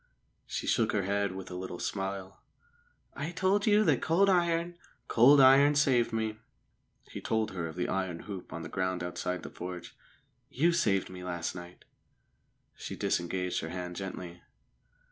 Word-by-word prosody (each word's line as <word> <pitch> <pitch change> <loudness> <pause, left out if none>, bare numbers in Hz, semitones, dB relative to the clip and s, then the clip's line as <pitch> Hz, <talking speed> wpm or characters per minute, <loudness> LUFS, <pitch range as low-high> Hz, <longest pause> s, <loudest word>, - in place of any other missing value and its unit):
She - - -4
shook 115 -2 +2
her 100 - +1
head 100 0 0
with 95 -1 -8
a - - -5
little 90 -1 -5
smile. 95 +1 -4 0.7
"I 145 +3 -4
told 190 +4 +1
you 210 0 +5
that 150 - +2
cold 190 +5 +3
iron 170 -1 +1
" - - -36
"Cold 135 +5 +6
iron 140 +2 +7
saved 125 -5 +3
me." 110 -1 -2 0.7
He - - -6
told 110 -1 0
her 85 -3 -3
of 80 - -8
the 90 - -1
iron 95 -3 -2
hoop 100 -4 -8
on 85 - -6
the - - -5
ground 95 -1 -2
outside 90 +1 -3
the - - -8
forge. 90 -1 -7 0.5
"You 165 +6 +2
saved 100 - +1
me 90 -1 -8
last 85 -2 -3
night." 90 0 -11 0.9
She - - -7
disengaged 90 +1 -1
her 80 - -5
hand 90 0 -5
gently. 90 -2 -7
95 Hz, 165 wpm, -30 LUFS, 90-140 Hz, 0.9 s, iron